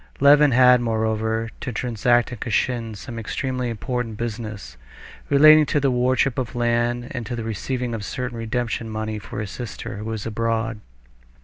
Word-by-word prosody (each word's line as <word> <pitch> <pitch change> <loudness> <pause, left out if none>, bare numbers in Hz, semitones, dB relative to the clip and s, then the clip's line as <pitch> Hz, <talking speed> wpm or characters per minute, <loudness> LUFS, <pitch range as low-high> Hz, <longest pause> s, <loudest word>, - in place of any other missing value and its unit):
Levin 145 +1 +7
had, 125 -1 +6
moreover, 110 0 0
to 125 - -4
transact 120 +1 +1
in 125 - -7
Kashin 115 0 -1
some 115 +3 -7
extremely 125 +2 -3
important 115 0 -3
business 110 - -5 0.5
relating 155 +2 +8
to 145 - +1
the 135 -2 +2
wardship 125 +1 +1
of 125 0 -4
land 120 0 0
and 120 -2 -4
to 120 - -3
the 115 - -4
receiving 120 +3 -3
of 110 -2 -4
certain 125 +2 -4
redemption 115 0 -3
money 110 0 -3
for - - -7
his 105 -3 -5
sister, 115 -4 -6
who 105 - -6
was 110 -2 -4
abroad. 115 0 -1
120 Hz, 165 wpm, -23 LUFS, 110-125 Hz, 0.5 s, relating